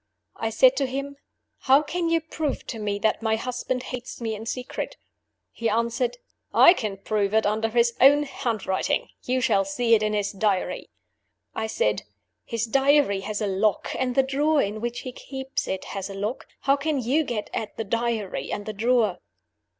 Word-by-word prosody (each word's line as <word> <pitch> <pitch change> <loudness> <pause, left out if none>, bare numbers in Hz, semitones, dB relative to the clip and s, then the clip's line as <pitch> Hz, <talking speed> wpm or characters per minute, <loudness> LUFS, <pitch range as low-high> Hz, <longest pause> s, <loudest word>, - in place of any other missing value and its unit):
"I 225 - -1
said 255 +4 +5
to 275 -1 +1
him, 275 +2 -4 0.4
'How 275 +3 +5
can 335 +2 -1
you 330 0 +2
prove 310 -2 -3
to 230 - -6
me 205 -1 -1
that 220 +2 +1
my 220 -1 +1
husband 250 +2 -3
hates 250 -1 -7
me 225 -2 -2
in 220 +1 -7
secret?' 255 +4 -4 0.5
"He 230 -1 -1
answered, 235 +2 0 0.4
'I 345 - +9
can 215 - -4
prove 205 +1 -1
it 220 - +3
under 215 +2 +1
his 235 +1 +3
own 285 +3 +7
handwriting; 225 -8 -1 0.2
you 255 +1 +1
shall 200 -5 +3
see 230 +4 +1
it 220 - +5
in 215 0 0
his 205 -1 0
Diary.' 205 - -1 0.6
"I 220 - -2
said, 105 - 0 0.4
'His 230 -1 -2
Diary 275 -4 +3
has 210 +2 -4
a 210 - 0
lock; 195 +2 0
and 250 -1 -1
the 270 - +5
drawer 290 +3 +2
in 210 -2 -1
which 240 0 -3
he 255 - -6
keeps 265 +1 -5
it 190 0 -3
has 195 0 -4
a 195 - -7
lock. 210 +5 -4
How 275 0 +4
can 285 0 -1
you 265 +6 +2
get 235 -7 -4
at 215 -1 -4
the 225 - -1
Diary 225 -2 -2
and 205 - -3
the 215 - -4
drawer? 235 +1 +2
235 Hz, 190 wpm, -25 LUFS, 215-265 Hz, 0.6 s, I